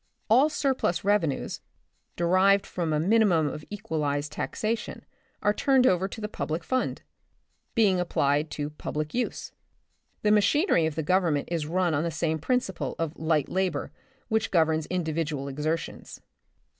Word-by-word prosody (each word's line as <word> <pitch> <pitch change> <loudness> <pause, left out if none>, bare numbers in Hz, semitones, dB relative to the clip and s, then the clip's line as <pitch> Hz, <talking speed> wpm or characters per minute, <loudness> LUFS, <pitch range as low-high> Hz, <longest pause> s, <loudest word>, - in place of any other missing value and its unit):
All 265 +7 +6
surplus 265 - 0
revenues, 195 -8 0 0.5
derived 190 +3 +3
from 170 -3 -3
a 150 - +1
minimum 185 -3 +3
of 150 +1 -5
equalized 150 -8 -2
taxation 225 +1 -3 0.4
are 205 - +3
turned 265 +2 +3
over 185 -3 +3
to 200 - -8
the 210 - -3
public 160 -3 -4
fund, 255 +8 -1 0.7
being 205 -6 +4
applied 150 -3 +1
to 145 -1 -4
public 150 0 -4
use. 245 - -3 0.7
The 210 - +3
machinery 210 - +3
of 155 - -4
the 160 - -2
Government 165 -3 +1
is 165 -3 -1
run 175 0 +1
on 145 - +1
the 170 - 0
same 160 0 -1
principle 245 - -1
of 165 -1 -3
light 160 -3 +1
labor 190 0 -1 0.4
which 220 -1 0
governs 160 -3 +2
individual 160 -5 -2
exertions. 150 +4 -4
170 Hz, 145 wpm, -27 LUFS, 155-205 Hz, 0.7 s, All